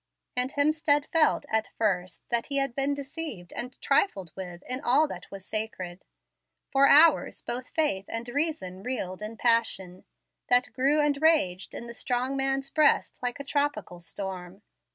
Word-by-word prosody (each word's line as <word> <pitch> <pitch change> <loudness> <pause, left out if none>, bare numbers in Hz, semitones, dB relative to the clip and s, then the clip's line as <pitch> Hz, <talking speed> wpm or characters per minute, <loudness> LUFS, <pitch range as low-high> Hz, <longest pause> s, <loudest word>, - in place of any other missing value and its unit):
And 250 +1 +1
Hemstead 295 0 +2
felt, 315 -3 +3
at 220 -3 0
first, 185 -4 -1
that 235 -1 +1
he 280 - 0
had 275 -3 0
been 275 +2 0
deceived 275 - -6
and 250 +1 -6
trifled 200 - +1
with 180 -2 -8
in 255 +1 -2
all 290 +4 +3
that - - -8
was 195 -1 -9
sacred. 190 -5 -4 0.7
For 275 0 +5
hours 310 +3 +5
both 250 +2 -5
faith 290 -12 0
and 230 +1 -5
reason 245 - -2
reeled 195 -5 -4
in 215 +2 -6
passion, 215 -6 0 0.4
that 245 0 +3
grew 275 +4 +3
and 290 -1 +1
raged 195 - +2
in - - -6
the 235 - -8
strong 250 +2 -1
man's 270 0 -1
breast 310 -1 +3
like 245 +2 -3
a - - -4
tropical 280 - -2
storm. 185 +2 -6
250 Hz, 160 wpm, -27 LUFS, 195-285 Hz, 0.7 s, For